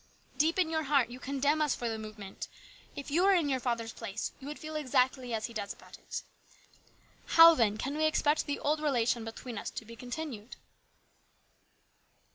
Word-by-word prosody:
Deep 320 +4 +2
in 345 -4 +2
your 315 -1 +1
heart 275 -5 +2
you 250 - -8
condemn 280 +3 +1
us 300 -3 +2
for 240 - -3
the 225 -1 -2
movement. 215 -3 -8 0.5
If 280 0 -7
you 330 +5 +3
were 390 +1 +5
in 325 -5 +2
your 260 -1 +1
father's 235 -3 -2
place 200 +3 -4
you 270 - -9
would 300 - -5
feel 310 0 -7
exactly 255 -3 +1
as 220 -1 -1
he 235 - -7
does 205 -2 -4
about - - -15
it. - - -6 1.1
How, 330 0 +11
then, 220 -7 +2
can 275 +6 -3
we 310 +1 +2
expect 305 0 +2
the 285 - -1
old 300 +1 0
relation 245 -5 +1
between 225 0 -6
us - - -4
to 225 - -7
be 230 +1 -10
continued 245 -2 -6
265 Hz, 190 wpm, -31 LUFS, 230-305 Hz, 1.1 s, How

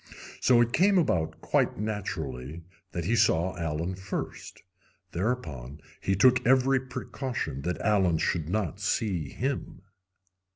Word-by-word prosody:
So 120 -2 +5
it 120 0 +1
came 195 +5 +4
about 90 - +1
quite - - +1
naturally 85 - -4 0.3
that 85 -2 -3
he 115 +6 +2
saw 90 -3 +3
Allen 80 +2 -2
first. 95 +1 -6 0.5
Thereupon 80 - -3 0.2
he 95 - +1
took 125 +6 +5
every 130 +1 +4
precaution 125 - -4
that 90 +4 -2
Allen 95 -6 +3
should 80 0 -1
not 100 -1 -1
see 100 -6 -1
him. 130 - -4
95 Hz, 125 wpm, -28 LUFS, 80-120 Hz, 0.5 s, So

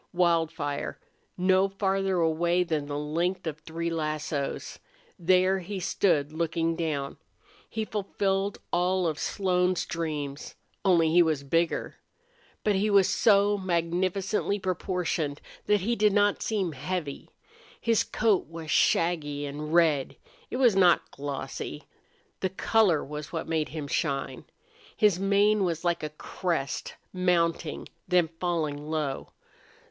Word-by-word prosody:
Wildfire 165 -4 0 0.4
no 185 +1 +3
farther 195 -1 0
away 170 +2 +2
than 155 -4 -2
the 145 0 -3
length 170 +5 -1
of 155 -2 -4
three 165 +2 -4
lassos! 155 -2 -3 0.4
There 185 +2 +3
he 190 +2 -5
stood 165 -5 +1
looking 165 0 0
down. 150 -4 -3 0.5
He 220 -1 -3
fulfilled 200 -1 -1 0.2
all 180 +1 +2
of 155 -3 -1
Slone's 180 -2 +1
dreams. 150 -4 -4 0.3
Only 170 -5 +4
he 175 +2 +6
was 155 -4 +1
bigger. 165 +4 0 0.7
But 210 - +2
he 200 +2 +1
was 200 -2 +5
so 205 -1 +4
magnificently 185 +3 0
proportioned 180 -5 -2 0.3
that 210 -1 +3
he 235 +5 0
did 210 -2 +3
not 205 0 +3
seem 200 -6 -1
heavy. 150 +1 -4 0.5
His 230 -2 +2
coat 215 -3 +1
was 165 -1 -7
shaggy 150 -3 +2
and 150 +2 -5
red. 160 -5 +3 0.3
It - - -3
was 245 -6 +4
not 180 -3 +4
glossy. 140 -1 -5 0.6
The 190 - 0
color 190 -3 +2
was 150 +1 -7
what 165 -1 -4
made 160 -2 0
him 155 -2 -5
shine. 135 0 -2 0.5
His 210 -5 +3
mane 200 +1 +3
was 170 -1 -2
like 170 -1 +1
a 155 - -3
crest, 155 -1 -3 0.2
mounting, 170 -3 0 0.2
then 180 -3 +3
falling 155 -4 -2
low. 150 -4 -3
170 Hz, 130 wpm, -27 LUFS, 155-190 Hz, 0.7 s, he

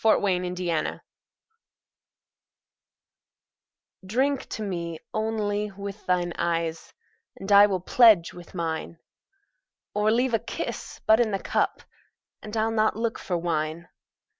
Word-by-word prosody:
Y 220 - +6
Z - - 0 0.2
To 180 0 -4
Celia 170 -3 -2 3.0
DRINK 260 +8 0
to 220 - -4
me, 170 -4 -4 0.2
only, 210 -1 -1
with 200 +1 -8
thine 175 -1 +1
eyes, 165 -1 -1 0.4
And 195 +1 -6
I 200 +1 +9
will 190 -3 -1
pledge 215 -3 +5
with 175 +1 -12
mine; 165 -1 -3 1.0
Or 210 +1 +2
leave 240 +2 +2
a 225 - +3
kiss - - -6
but 220 +1 +5
in 235 -2 +3
the 200 - 0
cup, - - -1 0.6
And 215 +1 -6
I'll 220 +1 +1
not 215 -1 +2
look 230 0 -2
for 180 - -2
wine. 165 0 -2
200 Hz, 130 wpm, -26 LUFS, 170-220 Hz, 3.0 s, I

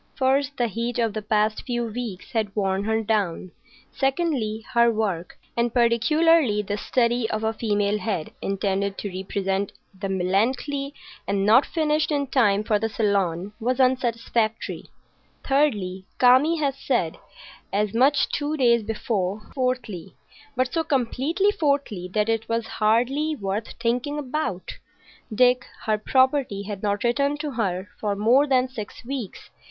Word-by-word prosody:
First, 275 +1 +1
the 245 - +2
heat 230 +3 -3
of 230 -3 +1
the 215 - -3
past 215 +1 +1
few 240 -2 -2
weeks 225 -4 -6
had 215 -4 -1
worn 195 -1 0
her 220 0 0
down; 200 -5 -1 0.4
secondly, 270 -7 -1
her 235 0 +5
work, 200 -6 -2 0.2
and 235 0 +1
particularly 245 +1 +3
the 205 0 -3
study 240 -1 +1
of 215 0 -2
a 220 0 +1
female 210 -2 0
head 190 -6 -3
intended 195 0 -1
to 205 - -4
represent 195 +1 -2 0.2
the 195 +1 -5
Melancolia 240 +10 0 0.3
and 195 0 0
not 225 +6 +5
finished 310 0 0
in 285 -1 +1
time 215 -7 +2
for 215 -1 +1
the 225 +1 -1
Salon, 200 -3 0
was 250 +3 -1
unsatisfactory; 235 -3 0 0.6
thirdly, 205 -10 +1
Kami 260 +7 +5
had 285 -3 0
said 245 -11 -1 0.5
as 205 +1 0
much 270 +4 +4
two 295 +1 -2
days 235 -3 +4
before; 210 -2 -3
fourthly,—but 255 - -4
so 325 -1 +1
completely 290 - +1
fourthly 280 - -1
that 210 +1 +1
it 225 0 -1
was 230 0 0 0.2
hardly 255 +8 +2
worth 205 -1 -3
thinking 245 +5 -1
about,—Dick, 250 - -2 0.2
her 215 -1 +1
property, 260 -4 +2
had 200 -1 -6
not 205 -1 -1
written 280 +4 +1
to 300 -1 -4
her 195 -6 -2
for 205 -2 -1
more 240 +8 +4
than 260 -2 +3
six 230 -3 -8
weeks. 255 -6 -6
230 Hz, 140 wpm, -24 LUFS, 205-265 Hz, 0.6 s, her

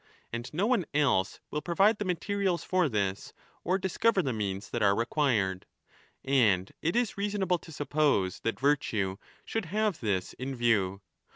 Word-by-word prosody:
And 120 +1 -4
no 175 +7 0
one 225 -8 +1
else 125 -11 +2
will 150 - -2
provide 195 +7 +3
the 205 - -2
materials 185 0 -1
for 185 -5 +1
this 100 -4 -2 0.3
or 185 +3 +1
discover 190 +2 +1
the 130 - -1
means 100 -2 -3
that 120 - -2
are 100 -1 +4
required. 115 -6 0 0.6
And 105 -9 +3
it 165 +6 0
is 240 -3 +2
20 200 - -5
reasonable 195 -4 0
to 160 - -13
suppose 145 - +1
that 115 - -2
virtue 110 -9 +1 0.3
should 225 -3 -2
have 210 +1 0
this 100 -6 -1
in 135 +1 -5
view. 100 -5 +1
145 Hz, 165 wpm, -29 LUFS, -, 0.6 s, are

